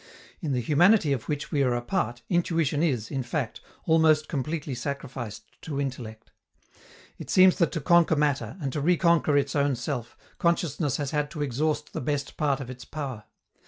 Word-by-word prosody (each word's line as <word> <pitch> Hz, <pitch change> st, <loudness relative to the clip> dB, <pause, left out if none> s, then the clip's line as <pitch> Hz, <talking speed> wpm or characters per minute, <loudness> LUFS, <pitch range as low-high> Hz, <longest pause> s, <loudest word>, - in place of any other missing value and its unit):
In 150 Hz, -6 st, -1 dB
the 125 Hz, -, 0 dB
humanity 160 Hz, -, +4 dB
of 125 Hz, -5 st, -5 dB
which 150 Hz, -1 st, -3 dB
we 145 Hz, -, +1 dB
are 125 Hz, -3 st, +2 dB
a 120 Hz, -, -1 dB
part, 120 Hz, 0 st, -2 dB
intuition 165 Hz, -4 st, +1 dB
is, 125 Hz, -10 st, 0 dB
in 135 Hz, -, -1 dB
fact, 125 Hz, 0 st, -3 dB, 0.2 s
almost 160 Hz, -1 st, +4 dB
completely 150 Hz, 0 st, -3 dB
sacrificed 125 Hz, -4 st, -5 dB, 0.2 s
to 145 Hz, -3 st, -4 dB
intellect. 120 Hz, -5 st, -5 dB, 0.9 s
It -, -, -8 dB
seems 185 Hz, -1 st, +6 dB
that 170 Hz, -, +3 dB
to 165 Hz, -, -2 dB
conquer 170 Hz, +1 st, +4 dB
matter, 145 Hz, -, 0 dB
and 135 Hz, -5 st, -3 dB
to 150 Hz, -, -2 dB
reconquer 170 Hz, -2 st, +3 dB
its 140 Hz, 0 st, 0 dB
own 140 Hz, -1 st, +2 dB
self, 120 Hz, -1 st, -5 dB, 0.2 s
consciousness 170 Hz, -4 st, +1 dB
has 145 Hz, -2 st, -3 dB
had 150 Hz, -1 st, 0 dB
to 150 Hz, -1 st, -4 dB
exhaust 150 Hz, +3 st, -1 dB
the -, -, -3 dB
best 140 Hz, +1 st, -2 dB
part 145 Hz, -4 st, +1 dB
of 135 Hz, -, -6 dB
its 125 Hz, -1 st, -10 dB
power. 130 Hz, -7 st, -6 dB
145 Hz, 180 wpm, -27 LUFS, 130-160 Hz, 0.9 s, seems